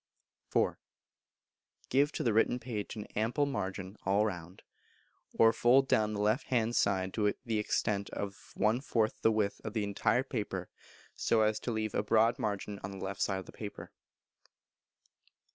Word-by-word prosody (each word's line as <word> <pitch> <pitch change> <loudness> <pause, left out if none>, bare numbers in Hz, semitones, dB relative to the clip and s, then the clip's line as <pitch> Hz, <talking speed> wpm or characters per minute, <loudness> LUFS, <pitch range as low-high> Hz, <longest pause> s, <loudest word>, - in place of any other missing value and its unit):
iv. - - +2 1.1
Give 140 +3 +3
to - - -2
the 115 - +2
written 115 +3 +3
page 115 -4 -5
an 105 -1 -6
ample 115 +7 +1
margin 95 -7 -4
all 100 +2 +3
round; 90 -3 -6 0.7
or 115 0 +5
fold 130 +3 +4
down 110 -3 +2
the 105 - -3
left 110 +8 +1
hand 120 -2 +1
side 95 -2 +1
to 105 -2 +1
the 110 -2 0
extent 100 -1 0
of 100 -1 -6
one 110 +4 +2
fourth 115 -5 0
the 110 - +4
width 105 -2 0
of 110 - -5
the 110 - 0
entire 100 +5 +1
paper 105 -8 -4 0.4
so 115 - +2
as 110 0 +1
to 120 - -3
leave 110 -2 -2
a - - +1
broad 110 +2 +3
margin 100 0 -3
on 95 - -3
the 95 -1 -6
left 100 +1 -5
side 95 - +1
of - - -13
the - - -11
paper. 105 -2 -8
110 Hz, 170 wpm, -32 LUFS, 100-115 Hz, 1.1 s, or